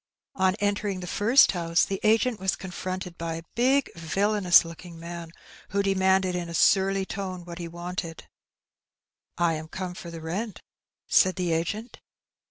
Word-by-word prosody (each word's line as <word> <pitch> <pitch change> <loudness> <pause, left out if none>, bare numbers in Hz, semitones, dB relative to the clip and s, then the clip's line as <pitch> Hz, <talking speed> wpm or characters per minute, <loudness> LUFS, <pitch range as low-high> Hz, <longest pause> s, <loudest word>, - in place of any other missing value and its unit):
On 190 0 +2
entering 205 -2 -1
the - - -5
first 225 +9 +5
house 170 -2 +1
the 195 -1 -3
agent 225 +2 +2
was 190 0 0
confronted 185 -1 -6
by 165 -1 -3
a 165 - -7
big, 260 +4 +2
villanous 185 +2 +3
looking 165 0 -10
man, 170 0 -7 0.4
who 200 +1 0
demanded 190 -1 +2
in 175 -1 -3
a 170 - -5
surly 195 +2 +3
tone 185 -3 -5
what 170 0 -8
he 170 - -4
wanted. 175 -1 -6 1.1
'^I 170 -1 +2
am 155 - -9
come 185 +2 -5
for 175 -1 -9
the 165 -1 -7
rent," 190 +7 -4 0.4
said 185 0 +4
the 180 -3 0
agent. 205 +9 -3
185 Hz, 160 wpm, -26 LUFS, 170-195 Hz, 1.1 s, first